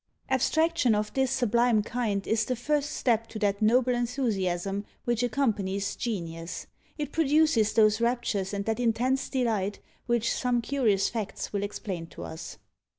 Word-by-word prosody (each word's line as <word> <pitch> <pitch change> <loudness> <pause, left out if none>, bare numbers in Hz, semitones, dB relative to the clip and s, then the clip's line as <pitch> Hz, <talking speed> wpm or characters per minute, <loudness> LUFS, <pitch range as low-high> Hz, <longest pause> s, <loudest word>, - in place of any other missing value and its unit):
Abstraction 315 -1 +2
of 210 0 -2
this 265 -1 +1
sublime 235 -3 +2
kind 210 -4 -2
is 220 0 +1
the 255 - -1
first 290 +4 0
step 230 -5 +1
to 225 - -8
that 205 -1 0
noble 245 +3 +4
enthusiasm 205 -6 -1 0.2
which 240 -1 +1
accompanies 210 -6 0
Genius; 170 -7 -4 0.3
it 295 -2 -3
produces 300 -8 +3
those 215 0 +4
raptures 235 -5 0
and 200 -1 -3
that 225 +2 -1
intense 245 +3 +1
delight, 220 -6 0 0.3
which 235 -1 +1
some 245 -1 +1
curious 230 -6 +1
facts 220 -3 -4
will 200 - 0
explain 195 -4 -4
to - - -10
us. 160 0 -7
230 Hz, 150 wpm, -28 LUFS, 205-250 Hz, 0.3 s, noble